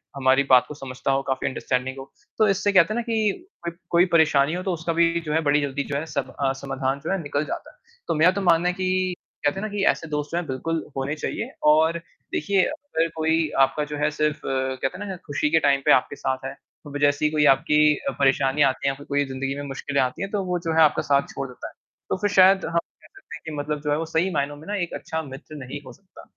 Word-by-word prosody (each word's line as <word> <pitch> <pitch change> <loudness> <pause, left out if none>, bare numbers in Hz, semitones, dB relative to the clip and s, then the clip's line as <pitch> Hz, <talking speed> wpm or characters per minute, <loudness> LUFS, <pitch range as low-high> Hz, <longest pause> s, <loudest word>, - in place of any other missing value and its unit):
हमारी 135 0 +3
बात 125 -1 +7
को 150 - -7
समझता 130 -1 -3
हो 135 0 +2
काफ़ी 130 0 -1
अंडरस्टैंडिंग 130 0 -2
हो, 135 0 -10 0.3
तो 215 - +4
इससे 200 +1 +1
कहते 185 +1 +5
हैं - - -4
ना 240 - 0
कि 225 - -1 0.2
कोई 170 - -3 0.2
कोई 175 +1 +5
परेशानी 155 -3 +4
हो 180 - -2
तो 190 - -1
उसका 165 0 -2
भी 170 0 +2
जो 150 - -2
है 160 - +2
बड़ी 145 +1 +4
जल्दी 140 0 -2
जो - - -1
है 155 - -3
सब 155 - -3
अ, 135 -1 +2
समाधान 135 0 -2
जो - - -2
है 195 -2 0
निकल 145 0 -2
जाता - - -6
है। - - -29 0.3
तो - - 0
मेरा 165 +4 +5
तो 200 +2 -3
मानना 175 -2 +3
है - - -1
कि 185 0 0 0.3
कहते 145 +6 +1
हैं - - -5
ना - - -8
कि 205 -1 -1
ऐसे 165 - -9
दोस्त 150 -1 -2
जो 170 - -1
हैं 175 - -2
बिल्कुल 160 +5 -2
होने 140 +3 -2
चाहिए - - -4 0.2
और 160 +2 +3 0.4
देखिए 195 +5 +2
अगर 290 - -2
कोई 160 0 +1 0.2
आपका 150 +2 -3
जो 150 - -3
है 150 +1 +1
सिर्फ़ 150 0 0
अ, 130 0 -1
कहते 135 - -2
हैं 205 - -6
ना 190 - -4
खुशी 145 0 0
के 160 +1 +4
टाइम 140 -1 +3
पे - - +5
आपके 130 +3 +3
साथ 130 -1 -3
है, 135 - -3 0.4
अब 145 0 -5
जैसी 145 +1 +1
कोई 150 - +4
आपकी 150 +1 +3
अ, - - -2
परेशानी 135 +1 +2
आती 140 - -4
है - - +3
या - - -10
फिर 145 - -12
कोई 145 0 +1
ज़िंदगी 135 0 -3
में 145 - -5
मुश्किलें 140 +1 -1
आती 125 -1 -2
हैं, 195 0 -3
तो 205 -2 -1
वो 180 -1 -1
जो 165 - +1
है - - +6
आपका 150 - +3
साथ 140 0 +2
छोड़ 135 - -4
देता 125 - -9
है। - - -13 0.4
तो - - 0
फिर 205 - +2
शायद 190 0 +6
हम 165 +1 -2 0.2
कह - - -17
सकतें 390 0 -12
हैं - - -20
कि 160 - -5
मतलब 150 0 -3
जो 150 0 -2
है 145 - +2
वो 165 - -2
सही 170 +4 +3
मायनों 145 0 -1
में 155 - -13
ना 205 - -2
एक 170 - -5
अच्छा 160 -2 -4
मित्र 140 +2 -10
नहीं 140 +3 -7
हो 130 - -10
सकता। 190 +8 -17
150 Hz, 270 wpm, -24 LUFS, 140-175 Hz, 0.4 s, बात